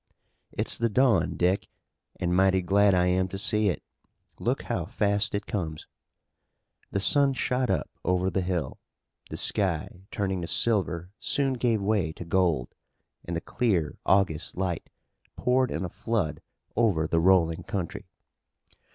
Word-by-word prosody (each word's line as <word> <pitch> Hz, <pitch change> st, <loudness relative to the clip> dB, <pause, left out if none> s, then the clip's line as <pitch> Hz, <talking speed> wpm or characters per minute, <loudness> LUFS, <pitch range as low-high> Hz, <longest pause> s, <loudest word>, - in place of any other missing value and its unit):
"It's -, -, -1 dB
the 115 Hz, 0 st, +2 dB
dawn, 110 Hz, -7 st, +2 dB
Dick, 90 Hz, +3 st, +1 dB, 0.5 s
and 90 Hz, 0 st, 0 dB
mighty 95 Hz, 0 st, +3 dB
glad 100 Hz, +1 st, +4 dB
I 90 Hz, 0 st, +3 dB
am 90 Hz, +1 st, +2 dB
to 95 Hz, -, -6 dB
see 105 Hz, +1 st, +2 dB
it. 90 Hz, -, -3 dB, 0.6 s
Look -, -, -1 dB
how -, -, -2 dB
fast 100 Hz, 0 st, 0 dB
it 100 Hz, -, -3 dB
comes!" 80 Hz, -6 st, -4 dB, 1.0 s
The 100 Hz, -, -1 dB
sun 140 Hz, +7 st, +4 dB
shot 130 Hz, -1 st, 0 dB
up, -, -, 0 dB, 0.2 s
over 90 Hz, +1 st, +1 dB
the 95 Hz, -, 0 dB
hill. 90 Hz, -7 st, -3 dB, 0.5 s
The -, -, -5 dB
sky 95 Hz, -1 st, 0 dB
turning 95 Hz, -3 st, -2 dB
to 85 Hz, -, -4 dB
silver 90 Hz, -6 st, +1 dB
soon 135 Hz, -2 st, 0 dB
gave 120 Hz, -4 st, 0 dB
way 100 Hz, -6 st, +1 dB
to 85 Hz, -, -9 dB
gold, 85 Hz, -7 st, +1 dB, 0.5 s
and 85 Hz, -, -4 dB
the 85 Hz, -, -2 dB
clear 95 Hz, -12 st, -1 dB
August 95 Hz, -6 st, +1 dB
light 90 Hz, -3 st, -2 dB, 0.5 s
poured 125 Hz, 0 st, +2 dB
in -, -, -3 dB
a -, -, -4 dB
flood 80 Hz, -9 st, -2 dB, 0.3 s
over 105 Hz, -9 st, +2 dB
the 80 Hz, +1 st, +1 dB
rolling 85 Hz, -2 st, +3 dB
country. 95 Hz, +2 st, -5 dB
95 Hz, 150 wpm, -27 LUFS, 85-105 Hz, 1.0 s, glad